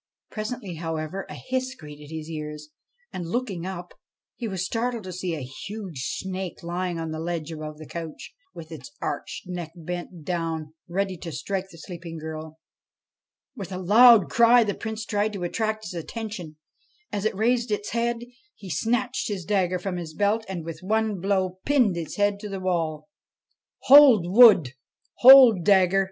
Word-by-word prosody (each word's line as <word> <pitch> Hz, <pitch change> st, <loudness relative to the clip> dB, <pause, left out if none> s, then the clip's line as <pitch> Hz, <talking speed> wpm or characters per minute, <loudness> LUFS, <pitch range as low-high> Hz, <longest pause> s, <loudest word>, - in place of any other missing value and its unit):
Presently, 215 Hz, -5 st, -5 dB
however, 165 Hz, +3 st, -4 dB
a -, -, -7 dB
hiss 260 Hz, 0 st, -3 dB
greeted 150 Hz, -, -12 dB
his 160 Hz, -1 st, -6 dB
ears; 150 Hz, -1 st, -7 dB, 0.4 s
and, 175 Hz, -2 st, -5 dB
looking 195 Hz, -6 st, -3 dB
up, 180 Hz, -2 st, -7 dB, 0.4 s
he 235 Hz, -, -5 dB
was 190 Hz, -3 st, -3 dB
startled 235 Hz, +2 st, -2 dB
to 185 Hz, -1 st, -7 dB
see 180 Hz, -1 st, -3 dB
a 150 Hz, -, -6 dB
huge 170 Hz, -, -7 dB
snake 190 Hz, -2 st, -5 dB
lying 175 Hz, 0 st, -3 dB
on 165 Hz, -1 st, -4 dB
the 155 Hz, -, -4 dB
ledge 165 Hz, -1 st, -4 dB
above 155 Hz, -1 st, -7 dB
the 155 Hz, -, -10 dB
couch, 165 Hz, 0 st, -8 dB, 0.2 s
with 160 Hz, -1 st, -11 dB
its 135 Hz, -7 st, -9 dB
arched 145 Hz, -, -5 dB
neck 175 Hz, -3 st, -6 dB
bent 175 Hz, 0 st, -7 dB
down 165 Hz, -3 st, -3 dB
ready 190 Hz, +1 st, -2 dB
to 165 Hz, 0 st, -7 dB
strike 190 Hz, +4 st, -4 dB
the 165 Hz, -, -14 dB
sleeping 170 Hz, -1 st, -8 dB
girl. 160 Hz, 0 st, -7 dB, 1.0 s
With 195 Hz, -2 st, -7 dB
a 185 Hz, -, -4 dB
loud 215 Hz, +3 st, +7 dB
cry 235 Hz, +1 st, +5 dB
the 205 Hz, -2 st, -1 dB
Prince 220 Hz, +1 st, -5 dB
tried 210 Hz, -1 st, -1 dB
to 195 Hz, -3 st, -5 dB
attract 215 Hz, +4 st, -2 dB
its 180 Hz, -, -6 dB
attention; 180 Hz, -2 st, -6 dB, 0.5 s
then, 205 Hz, -, -2 dB
as 200 Hz, -, -5 dB
it 220 Hz, -, 0 dB
raised 235 Hz, +3 st, +1 dB
its 210 Hz, -1 st, -2 dB
head, 235 Hz, +1 st, -1 dB, 0.3 s
he 190 Hz, -3 st, -9 dB
snatched 245 Hz, -, -1 dB
his 195 Hz, -5 st, -4 dB
dagger 185 Hz, -2 st, +1 dB
from 180 Hz, 0 st, -4 dB
his 160 Hz, -3 st, -7 dB
belt, 205 Hz, +4 st, +1 dB
and, 175 Hz, -4 st, -5 dB
with 165 Hz, -1 st, -6 dB
one 215 Hz, +1 st, 0 dB
blow, 185 Hz, -1 st, -1 dB
pinned 250 Hz, -10 st, +3 dB
its 165 Hz, -3 st, -5 dB
head 205 Hz, 0 st, +1 dB
to 210 Hz, 0 st, -7 dB
the 195 Hz, -1 st, -5 dB
wall. 165 Hz, -5 st, -2 dB, 0.4 s
' -, -, -53 dB
Hold 265 Hz, -9 st, +8 dB
wood! 190 Hz, -, +7 dB, 0.5 s
Hold 250 Hz, -7 st, +9 dB
dagger 195 Hz, -1 st, +4 dB
185 Hz, 175 wpm, -25 LUFS, 165-215 Hz, 1.0 s, Hold